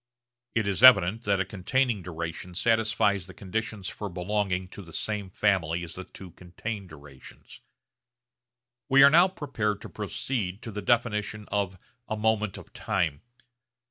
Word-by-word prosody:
It 110 -3 +1
is 100 +1 -1
evident 110 -3 +7
that 100 -1 +2
a 95 - +1
containing 110 +4 0
duration 85 +1 -6
satisfies 105 -3 +2
the 95 - -12
conditions 105 0 -4
for 105 +1 -5
belonging 95 0 -1
to 100 - -9
the 85 -3 -13
same 105 0 -2
family 90 -4 +1
as 85 - -7
the 95 - -8
two 95 -2 -12
contained 95 +3 -7
durations. 70 -4 -14 1.3
We 135 +1 +7
are 140 - +8
now 170 +4 +7
prepared 120 - -2
to - - -9
proceed 105 -1 -3
to 115 - -6
the 105 0 -5
definition 105 -2 0
of 100 -2 -1 0.3
a 110 - -3
moment 110 -2 0
of - - -13
time. 80 -4 -1
100 Hz, 150 wpm, -27 LUFS, 90-110 Hz, 1.3 s, are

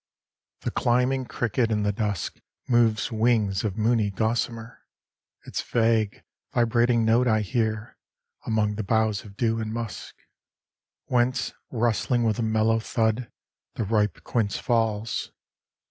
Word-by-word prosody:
V - - -21
The - - 0
climbing 125 +2 +1
cricket 120 0 0
in 105 -2 0
the 105 - +2
dusk 105 -3 -3 0.3
Moves 120 -2 +2
wings 110 -4 +2
of 105 -2 -2
moony 110 -1 +2
gossamer; 115 +2 -2 0.7
Its - - -3
vague, 115 -3 +1 0.3
vibrating 120 0 +2
note 120 +3 +3
I 110 -2 +3
hear 110 0 -2 0.4
Among 105 -2 0
the 110 - -2
boughs 110 -1 +1
of 100 -1 -14
dew 115 -1 +1
and 110 -1 -3
musk, 115 -2 -5 0.9
Whence, 125 +1 +1 0.2
rustling 120 +1 +1
with 110 -1 +1
a - - +1
mellow 110 0 +2
thud, 115 +1 -1 0.4
The - - -1
ripe 105 -3 0
quince 110 -4 0
falls. 115 -2 -1
115 Hz, 130 wpm, -26 LUFS, 110-120 Hz, 0.9 s, note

